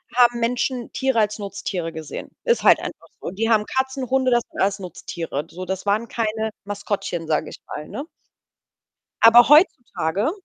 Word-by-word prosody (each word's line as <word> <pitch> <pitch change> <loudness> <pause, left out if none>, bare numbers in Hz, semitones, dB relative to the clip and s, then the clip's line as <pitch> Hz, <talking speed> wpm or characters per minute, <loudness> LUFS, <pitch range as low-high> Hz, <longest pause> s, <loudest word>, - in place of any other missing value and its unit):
haben 240 -1 +5
Menschen 245 +1 -1
Tiere 265 -3 +1
als 215 0 0
Nutztiere 195 -4 -4
gesehen“. 160 -2 -7 0.2
Ist 475 0 +2
halt - - +6
einfach - - -8
so. - - -4
Die 225 +4 -1
haben 215 -2 +3
Katzen, 265 -1 -2
Hunde 260 -1 +2
das 240 -1 +3
sind - - -5
alles 195 +1 +1
Nutztiere. 165 -4 -5
So, 185 +2 -7
das 190 +2 -4
waren 215 +3 +1
keine 220 -1 -2 0.2
Maskottchen, 200 -5 -3
sage 155 -1 0
ich - - -10
mal, 150 - -7
ne? 280 - -5 1.2
Aber 235 +1 +8
heutzutage 245 - +3
220 Hz, 165 wpm, -22 LUFS, 190-245 Hz, 1.2 s, Aber